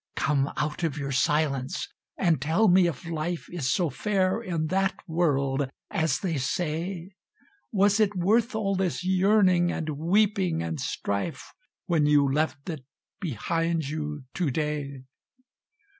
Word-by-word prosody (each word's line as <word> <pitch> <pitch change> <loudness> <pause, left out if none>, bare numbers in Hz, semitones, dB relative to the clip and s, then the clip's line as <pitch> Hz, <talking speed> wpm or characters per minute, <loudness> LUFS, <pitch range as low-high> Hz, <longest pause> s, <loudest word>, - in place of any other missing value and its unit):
"Come 140 +1 +1
out 150 +3 -2
of 155 -3 -1
your 140 -1 -3
silence 140 +1 0 0.3
and 165 -7 +2
tell 165 +10 +3
me 180 -1 +5
if 170 -2 -5
Life 165 +1 -3
Is 145 -8 -1
so 170 -2 +1
fair 190 - 0
in 170 -7 -2
that 195 0 +2
world 140 -5 +1 0.2
as 160 -4 +1
they 170 -6 -1
say; 170 +6 -2 0.6
Was 205 +1 +3
it 205 -2 +2
worth 220 +6 +2
all 200 -3 0
this 185 -1 -1
yearning, 185 -2 +4
and 160 - -3
weeping, 180 - +1
and 80 -2 -3
strife 100 +8 -3 0.3
When 160 -4 +2
you 145 -1 +4
left 145 0 -1
it 155 -6 -5 0.4
behind 165 - -1
you 150 -2 -4
to 175 -5 0
day? 145 -2 -3
165 Hz, 140 wpm, -27 LUFS, 145-185 Hz, 0.6 s, me